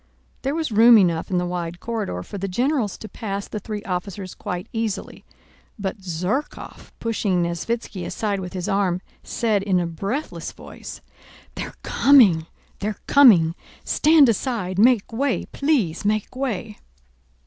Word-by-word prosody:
There 275 Hz, +3 st, -1 dB
was 320 Hz, -5 st, -2 dB
room 225 Hz, +2 st, +8 dB
enough 170 Hz, -5 st, +2 dB
in 185 Hz, -, 0 dB
the 180 Hz, -, 0 dB
wide 175 Hz, -1 st, -4 dB
corridor 210 Hz, -, -3 dB
for 200 Hz, -, -7 dB
the 195 Hz, -, -2 dB
generals 240 Hz, +2 st, 0 dB
to 220 Hz, -, -9 dB
pass 200 Hz, -3 st, -5 dB
the 215 Hz, -, -5 dB
three 210 Hz, 0 st, -6 dB
officers 185 Hz, 0 st, -4 dB
quite 180 Hz, 0 st, -5 dB
easily, 225 Hz, -3 st, -3 dB, 0.5 s
but 200 Hz, 0 st, -4 dB
Zherkóv, 185 Hz, -, -4 dB
pushing 205 Hz, -6 st, 0 dB
Nesvítski 185 Hz, +3 st, -3 dB
aside 205 Hz, 0 st, -2 dB
with 180 Hz, -1 st, -6 dB
his 180 Hz, -2 st, -4 dB
arm, 190 Hz, -3 st, +1 dB, 0.2 s
said 220 Hz, -4 st, 0 dB
in 190 Hz, -2 st, +1 dB
a 175 Hz, -, 0 dB
breathless 200 Hz, -, -4 dB
voice, -, -, -10 dB, 0.5 s
"They're -, -, -6 dB
coming!... 205 Hz, -, +5 dB, 0.3 s
they're 210 Hz, 0 st, -3 dB
coming!... 200 Hz, -, +6 dB, 0.3 s
Stand 305 Hz, -2 st, +5 dB
aside, 210 Hz, -5 st, -1 dB
make 235 Hz, -1 st, +4 dB
way, 265 Hz, +2 st, 0 dB
please 260 Hz, -, 0 dB
make 215 Hz, +3 st, -1 dB
way!" 225 Hz, -5 st, -3 dB
205 Hz, 145 wpm, -23 LUFS, 180-235 Hz, 0.5 s, room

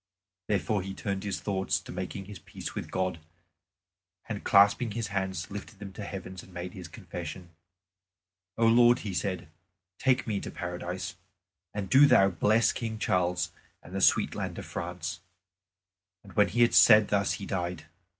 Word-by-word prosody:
Therefore 105 Hz, 0 st, 0 dB
he 95 Hz, +1 st, -6 dB
turned 100 Hz, -1 st, -3 dB
his 100 Hz, -2 st, -3 dB
thoughts 95 Hz, -2 st, -1 dB
to -, -, -11 dB
making 95 Hz, +2 st, -5 dB
his 100 Hz, -1 st, -10 dB
peace -, -, -8 dB
with -, -, -5 dB
God, 95 Hz, -3 st, -1 dB, 1.1 s
and -, -, -5 dB
clasping 100 Hz, +3 st, +4 dB
his 115 Hz, -2 st, -3 dB
hands 95 Hz, -3 st, -3 dB
lifted 100 Hz, +2 st, -8 dB
them 100 Hz, -1 st, -9 dB
to 105 Hz, -, -7 dB
heaven 95 Hz, -2 st, -7 dB
and 95 Hz, -, -16 dB
made 90 Hz, 0 st, -6 dB
his 90 Hz, -3 st, -8 dB
confession. 90 Hz, -2 st, -8 dB, 1.1 s
"O 115 Hz, -, +3 dB
Lord," 120 Hz, +1 st, +6 dB
he 100 Hz, -, -3 dB
said, 95 Hz, -1 st, -2 dB, 0.5 s
"take 130 Hz, -1 st, +2 dB
me 105 Hz, -3 st, -1 dB
into -, -, -5 dB
Paradise. 90 Hz, +1 st, -5 dB, 0.5 s
And 100 Hz, -2 st, -4 dB
do 135 Hz, +9 st, +7 dB
Thou 95 Hz, -7 st, +6 dB
bless 110 Hz, +6 st, +3 dB
King 115 Hz, -2 st, -4 dB
Charles 90 Hz, -4 st, 0 dB, 0.3 s
and 90 Hz, -, -12 dB
the 95 Hz, -, -2 dB
sweet -, -, +4 dB
land -, -, -4 dB
of -, -, -6 dB
France." 85 Hz, -1 st, -5 dB, 1.0 s
And 100 Hz, -, -14 dB
when 105 Hz, -1 st, +4 dB
he 120 Hz, +2 st, +3 dB
had 120 Hz, -, +3 dB
said 105 Hz, -2 st, +7 dB
thus 100 Hz, -1 st, +1 dB
he 100 Hz, -, -5 dB
died. 90 Hz, -4 st, -3 dB
95 Hz, 170 wpm, -29 LUFS, 90-105 Hz, 1.1 s, do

